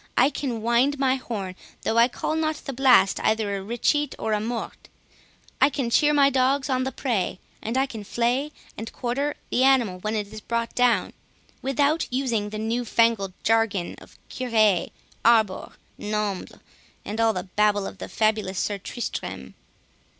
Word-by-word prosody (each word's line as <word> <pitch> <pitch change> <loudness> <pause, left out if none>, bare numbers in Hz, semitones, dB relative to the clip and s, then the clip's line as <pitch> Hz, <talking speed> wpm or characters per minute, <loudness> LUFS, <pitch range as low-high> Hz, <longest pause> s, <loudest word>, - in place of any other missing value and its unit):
I 265 +4 +5
can 250 -6 -3
wind 240 +5 +2
my 265 -1 +2
horn, 205 -7 -5 0.3
though 225 - +2
I 235 - +7
call 285 +4 -3
not 315 -1 0
the 275 - -4
blast 245 -7 +5
either 215 -2 0
a 195 - -4
'recheate' 240 +7 0
or 220 - -1
a 210 - +1
'morte'—I 240 +3 -4
can 265 -5 -2
cheer 295 +5 +4
my 280 -2 +4
dogs 265 +1 +1
on 255 0 +1
the 265 - -2
prey, 230 -9 -1 0.2
and 230 +4 -2
I 265 - +3
can 225 -6 -8
flay 245 +7 0 0.2
and 225 - -6
quarter 275 +4 -2 0.2
the 255 - +2
animal 245 -9 +3
when 215 +3 -2
it 210 -1 -3
is 215 - -8
brought 235 0 -2
down, 245 -2 +2 0.5
without 285 +4 +1
using 240 -5 -1
the 215 - -6
newfangled 225 -3 +1
jargon 225 -5 +1
of - - -17
'curee, 220 -7 +1 0.3
arbor, 220 -5 +3 0.3
nombles', 210 -2 -3 0.5
and 215 +2 -2
all 225 -1 +3
the 180 - -3
babble 205 +1 +1
of 195 - -8
the - - -7
fabulous 215 -3 0
Sir 205 +1 -1
Tristrem." 240 +5 -5
230 Hz, 165 wpm, -25 LUFS, 210-260 Hz, 0.5 s, I